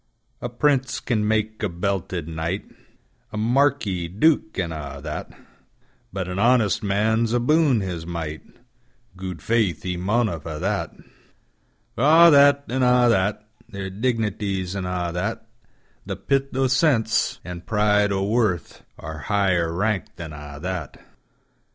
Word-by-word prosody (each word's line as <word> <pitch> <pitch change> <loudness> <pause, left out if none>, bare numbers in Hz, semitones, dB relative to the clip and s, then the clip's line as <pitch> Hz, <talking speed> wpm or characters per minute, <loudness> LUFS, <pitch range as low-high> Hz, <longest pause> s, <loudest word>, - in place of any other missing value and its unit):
A 120 - -3
prince 130 +1 +1
can 105 -4 -1
mak 110 0 0
a 105 - 0
belted 90 -2 -3
knight,A 85 +5 -7
marquis, 115 -6 +1
duke, 110 - +1
an' 90 -3 -1
a' 70 -3 -6
that; 75 +1 -6 0.8
But 95 -2 -3
an 90 +1 -4
honest 115 -5 +3
man's 110 +3 +1
abon 135 -1 +3
his 90 -4 -4
might, 80 -2 -5 0.7
Gude 90 -4 -7
faith, 105 -9 +1
he 90 -1 -3
maunna 105 -1 0
fa' 75 +1 -6
that! - - -2 1.0
For 120 - -2 0.2
a' - - +7
that, 140 0 +6
an' 130 +2 -1
a' 125 -1 +4
that, 105 0 +1 0.2
Their 100 -3 -6
dignities 105 -4 -2
an' 95 -2 -3
a' 90 -1 -2
that; 95 +5 -3 0.6
The - - -3
pith 135 -1 -1
o' 135 - +3
sense, 125 -4 +2
an' 90 -1 -6
pride 105 0 +2
o' 95 -1 0
worth, 105 -4 -1
Are 80 0 -7
higher 95 -5 +2
rank 100 +3 -1
than 80 -4 -8
a' 75 -1 -9
that. 95 0 -4
100 Hz, 140 wpm, -23 LUFS, 90-115 Hz, 1.0 s, a